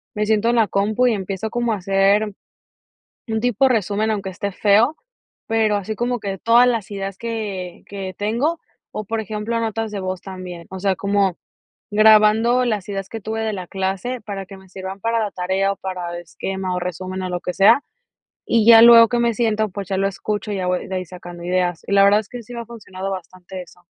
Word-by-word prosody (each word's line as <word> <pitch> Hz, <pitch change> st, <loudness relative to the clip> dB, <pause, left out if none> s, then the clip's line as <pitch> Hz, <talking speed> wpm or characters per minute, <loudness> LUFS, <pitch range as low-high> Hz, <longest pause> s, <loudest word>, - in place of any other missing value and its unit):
me 210 Hz, 0 st, 0 dB
siento 220 Hz, +1 st, +2 dB
en 240 Hz, -, +2 dB
la 225 Hz, -2 st, +4 dB
compu 210 Hz, +6 st, +1 dB
y 240 Hz, -, +3 dB
empiezo 195 Hz, +1 st, -3 dB
como 240 Hz, 0 st, 0 dB
a -, -, -2 dB
hacer 195 Hz, +2 st, +2 dB, 1.0 s
un 220 Hz, 0 st, -1 dB
tipo 245 Hz, +2 st, +3 dB
resumen. 215 Hz, -2 st, 0 dB
Aunque 200 Hz, -3 st, -2 dB
esté 200 Hz, +2 st, -4 dB
feo, 215 Hz, +10 st, +3 dB, 0.5 s
pero 220 Hz, -2 st, +2 dB
así 205 Hz, +2 st, -4 dB
como 240 Hz, +2 st, -1 dB
que 195 Hz, -1 st, -4 dB
todas 235 Hz, +5 st, +5 dB
las 225 Hz, -5 st, -1 dB
ideas 195 Hz, -1 st, -5 dB
que 205 Hz, -6 st, -5 dB
que 195 Hz, -2 st, -6 dB
tengo, 235 Hz, +11 st, 0 dB, 0.3 s
o, 215 Hz, -, -4 dB
por 225 Hz, +2 st, -2 dB
ejemplo, 215 Hz, +2 st, -3 dB
notas 225 Hz, -1 st, -2 dB
de 200 Hz, -, -3 dB
voz 185 Hz, -1 st, -4 dB
también. 180 Hz, -3 st, -8 dB
O 190 Hz, -, -6 dB
sea, 195 Hz, 0 st, +1 dB
como 200 Hz, -2 st, 0 dB, 0.5 s
grabando 220 Hz, +3 st, +5 dB
las 215 Hz, -6 st, -2 dB
ideas 195 Hz, -1 st, -4 dB
que 225 Hz, -, -6 dB
tuve 220 Hz, +2 st, -3 dB
de 220 Hz, -1 st, -1 dB
la 185 Hz, -3 st, -6 dB
clase 195 Hz, +7 st, -3 dB
para 200 Hz, -2 st, -6 dB
que 195 Hz, -, -11 dB
me 190 Hz, -1 st, -18 dB
sirvan 190 Hz, +1 st, -7 dB
para 230 Hz, +2 st, +1 dB
la 210 Hz, -2 st, -1 dB
tarea, 190 Hz, +2 st, 0 dB
o, -, -, -14 dB
para 180 Hz, -3 st, -5 dB
esquema, 185 Hz, +2 st, -4 dB
o, -, -, -1 dB
resumen, 185 Hz, +1 st, -5 dB
o, 185 Hz, -, -3 dB
lo 180 Hz, -1 st, -3 dB
que 180 Hz, -, -3 dB
sea, 225 Hz, +9 st, +5 dB, 0.6 s
y 230 Hz, -2 st, +3 dB
ya 225 Hz, -1 st, +9 dB
luego 230 Hz, -1 st, +9 dB
que 240 Hz, -, 0 dB
me 235 Hz, -1 st, +2 dB
siento, 220 Hz, -2 st, +1 dB
pues, 195 Hz, -1 st, -7 dB
ya 195 Hz, -, -1 dB
lo 195 Hz, 0 st, +2 dB
escucho, 210 Hz, +2 st, -4 dB
y -, -, -2 dB
ya 185 Hz, -1 st, -2 dB
voy 180 Hz, 0 st, -1 dB
de 190 Hz, -, -4 dB
ahí 185 Hz, -, -3 dB
sacando 175 Hz, 0 st, -10 dB
ideas. 180 Hz, -1 st, 0 dB
Y -, -, -4 dB
la 200 Hz, 0 st, +6 dB
verdad 205 Hz, +1 st, +5 dB
es 215 Hz, -, -13 dB
que 245 Hz, -1 st, -8 dB
sí 245 Hz, +2 st, -11 dB
me 235 Hz, -, -5 dB
ha -, -, -13 dB
funcionado 195 Hz, -4 st, -7 dB
bastante 185 Hz, 0 st, -8 dB
eso. 180 Hz, -, -18 dB
200 Hz, 220 wpm, -21 LUFS, 190-225 Hz, 1.0 s, ya